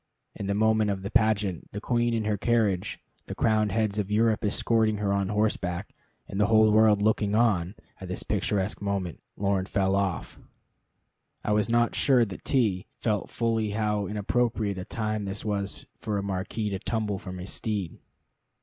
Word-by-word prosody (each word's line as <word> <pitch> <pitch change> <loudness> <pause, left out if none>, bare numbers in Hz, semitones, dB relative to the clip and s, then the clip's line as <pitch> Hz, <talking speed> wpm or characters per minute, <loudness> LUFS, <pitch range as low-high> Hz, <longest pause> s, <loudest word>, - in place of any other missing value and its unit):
In 100 - -5
the 100 - 0
middle 110 0 +3
of 95 -1 -2
the 100 - -4
pageant, 105 -6 +1
the 105 - -3
Queen 120 +1 +1
in 110 - 0
her 105 -1 +1
carriage, 100 -4 0 0.3
the - - -5
crowned 110 -2 +2
heads 110 -1 0
of 100 -1 -2
Europe 110 +1 +2
escorting 110 +1 +2
her 100 -1 0
on 100 -1 0
horseback, 105 -4 -1 0.3
and 95 - -4
the 105 - +4
whole 110 0 +5
world 105 -1 +5
looking 105 -1 +2
on 105 -5 +2 0.2
at 95 - -7
this 90 - -4
picturesque 100 0 -1
moment, 100 -4 -2 0.2
Lorne 100 -1 0
fell 95 -1 +1
off. 100 -3 -2 1.0
I - - -1
was 105 +1 +2
not 120 0 +3
sure 130 -4 +4
that 100 -3 -9
T 110 -8 +1
felt 105 -4 -1
fully 115 -2 0
how 105 -2 0
inappropriate 105 -1 0
a 90 - -5
time 110 -2 -2
this 100 +2 -5
was 100 -2 -3
for 105 -2 -2
a 100 - -2
marquis 100 +2 -2
to 95 - -2
tumble 105 -2 -2
from 90 -2 -7
his 90 +2 -6
steed. 105 -6 -3
105 Hz, 175 wpm, -27 LUFS, 100-110 Hz, 1.0 s, whole